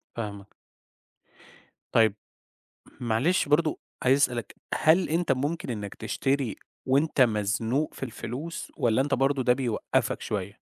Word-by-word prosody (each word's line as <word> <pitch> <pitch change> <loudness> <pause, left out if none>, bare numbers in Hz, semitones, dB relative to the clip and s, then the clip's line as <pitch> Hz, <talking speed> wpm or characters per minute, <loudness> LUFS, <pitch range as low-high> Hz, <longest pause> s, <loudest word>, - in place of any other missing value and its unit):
فاهمك. 100 -3 -6 1.4
طيب، 110 -3 +4 0.8
معلش 125 +10 +1
برضه 155 +1 +2 0.2
عايز 130 +2 +5
أسألك، 125 -4 0 0.2
هل 170 +4 +4
أنت 165 -1 +1
ممكن 145 +4 -1
إنك 105 -4 -4
تشتري 135 -6 -1 0.3
وأنت 140 +2 +2
مزنوق 115 +5 +1
في - - -7
الفلوس 135 +6 -6
والّا 120 +1 +2
أنت 145 +2 -1
برضه 135 +1 +2
ده 125 - +5
بيوقَفَك 125 -4 -1
شوية؟ 100 -1 -4
130 Hz, 120 wpm, -27 LUFS, 110-145 Hz, 1.4 s, عايز